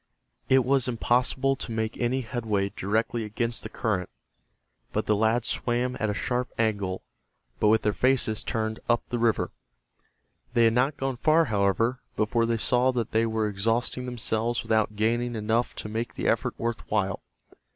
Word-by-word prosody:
It 130 -2 +5
was 135 -1 +2
impossible 125 +3 +1
to - - -6
make 110 0 -2
any 125 +2 0
headway 110 -5 -1
directly 110 +4 -1
against 115 +2 -2
the - - -6
current, 95 -6 -2 0.9
and - - +1
the 105 - +3
lads 110 +3 +2
swam 125 +1 0
at 110 - 0
a - - 0
sharp 125 +3 -1
angle 100 -4 -1 0.6
but - - +3
with 110 +1 +4
their 105 - +2
faces 125 -4 +1
turned 110 -1 -2
up 120 0 +3
the 120 - -2
river. 115 -1 +1 1.0
They 120 - +5
had 115 -1 +5
not 130 +5 +1
gone 135 -2 -2
far, 155 +5 +4
however, 105 +6 +1
before 115 +2 +1
they 115 0 +1
saw 125 +3 +2
that 120 -3 -2
they 115 +1 +2
were 110 -1 0
exhausting 115 +5 0
themselves 120 -1 -1
without 110 -1 +1
gaining 120 +3 0
enough 110 +3 0
to - - -5
make 115 +3 -4
the - - -2
effort - - 0
worth 115 0 -3
while. 100 -3 0
115 Hz, 170 wpm, -27 LUFS, 110-125 Hz, 1.0 s, It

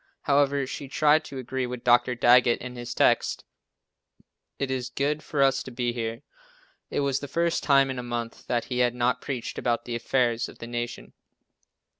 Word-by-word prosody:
However, 140 -1 +2
she 135 +1 -6
tried 150 +2 +3
to 135 - -8
agree 130 0 -3
with 125 -1 -6
Dr. 120 +1 +4
Daggett 120 0 +5
in 125 0 -7
his 120 0 -6
text, - - +2 1.1
"It 135 -1 -2
is 130 -1 -2
good 145 +2 -1
for 145 -2 0
us 135 0 +3
to - - -8
be 120 -1 -2
here." 115 -1 -4 0.7
It - - -1
was 140 -1 0
the 145 - -6
first 170 +4 0
time 135 -2 +4
in 130 - -4
a - - -2
month 120 -1 -5
that 120 -1 0
he 125 -1 -3
had 125 -1 +2
not 125 0 +1
preached 130 -4 -4
about 120 -1 -1
the 120 - -5
affairs 120 -1 0
of - - -14
the - - -8
Nation. 120 0 -5
125 Hz, 190 wpm, -26 LUFS, 120-135 Hz, 1.1 s, Daggett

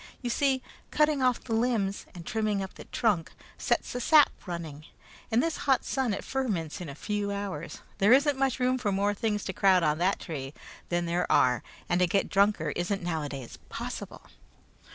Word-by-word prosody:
You 240 - -1
see, 265 0 +1 0.3
cutting 300 -2 +2
off 255 -2 +2
the 230 - -4
limbs 225 -4 0
and 170 -1 -9
trimming 215 -3 0
up 190 - -7
the - - -11
trunk 205 -9 0 0.3
sets - - 0
the 245 - -3
sap 300 +3 +6 0.2
running. 160 -4 -6 0.4
In 230 +1 +3
this 330 +2 -1
hot 265 -2 +3
sun 265 -4 0
it 200 - -3
ferments 200 - -2
in 170 - -6
a 140 - -7
few 205 +4 -2
hours. 200 -6 -5 0.2
There 200 +3 +5
isn't 280 +2 +5
much 270 -2 +1
room 255 0 +2
for 210 -5 0
more 200 +1 +1
things 210 -1 -1
to 190 - -4
crowd 185 -2 +4
on 150 0 +1
that 185 +3 +2
tree 140 -4 -6 0.3
than 175 0 0
there 170 +1 -1
are, 125 -1 +4 0.3
and 175 - +1
to 180 - +4
get 195 +4 +1
drunker 200 -6 +2
isn't 185 +2 -1
noways 145 -7 -4
possible." - - -6
200 Hz, 190 wpm, -28 LUFS, 175-245 Hz, 0.4 s, sap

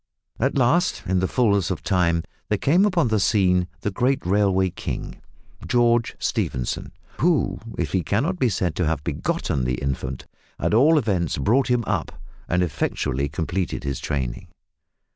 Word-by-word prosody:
At 135 +4 +1
last, 165 +9 +2
in 95 0 +1
the 95 - +1
fulness 100 -7 +2
of 95 - -3
time 90 -3 +1 0.3
there 105 - +2
came 170 - +3
upon 170 - +1
the 110 -1 +2
scene 90 -3 +2
the 105 - -1
great 125 +4 0
railway 95 -1 +2
king, - - -6 0.5
George 120 -1 +2
Stephenson, 60 -2 -2 0.3
who, 150 - +2 0.2
if 80 -5 -2
he 95 - +1
cannot 145 - -1
be 125 - +3
said 90 -4 -1
to 85 - +1
have 75 -3 -1
begotten 65 - -1
the 60 0 0
infant, 65 -1 -4 0.3
at - - 0
all 145 +8 +5
events 95 - 0
brought 120 - +2
him 125 -1 +2
up 90 -5 -2 0.4
and 90 +1 +2
effectually 70 -3 -1
completed 85 +5 -3
his 70 -2 -3
training. 65 -5 -3
95 Hz, 160 wpm, -23 LUFS, 85-120 Hz, 0.5 s, all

